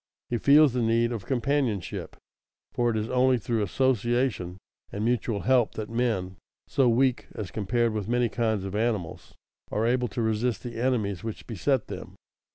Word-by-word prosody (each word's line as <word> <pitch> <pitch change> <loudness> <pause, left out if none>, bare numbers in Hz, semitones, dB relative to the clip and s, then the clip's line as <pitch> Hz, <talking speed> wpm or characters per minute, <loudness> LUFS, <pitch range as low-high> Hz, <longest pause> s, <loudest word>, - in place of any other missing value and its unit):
He 120 - 0
feels 145 0 +6
the 125 - 0
need 115 +1 +2
of 110 -5 -5
companionship, 130 - -1 0.6
for 120 -1 +1
it 110 - 0
is 110 +1 -2
only 130 0 +4
through 115 -1 -1
association 120 -3 0 0.3
and 105 +2 -3
mutual 115 -3 0
help 125 -3 +2
that 110 0 -5
men, 110 -7 -1 0.3
so 130 -3 +3
weak 125 +1 +2
as 105 -4 -5
compared 115 +2 0
with 105 -1 -3
many 120 0 +2
kinds 110 -3 -1
of 95 0 -5
animals, 105 -6 -2 0.4
are 110 - 0
able 125 +1 +2
to 115 +2 -3
resist 110 -1 0
the 120 -1 -5
enemies 110 -7 0
which 110 -2 -6
beset 125 +3 0
them. - - -8
115 Hz, 165 wpm, -27 LUFS, 105-125 Hz, 0.6 s, feels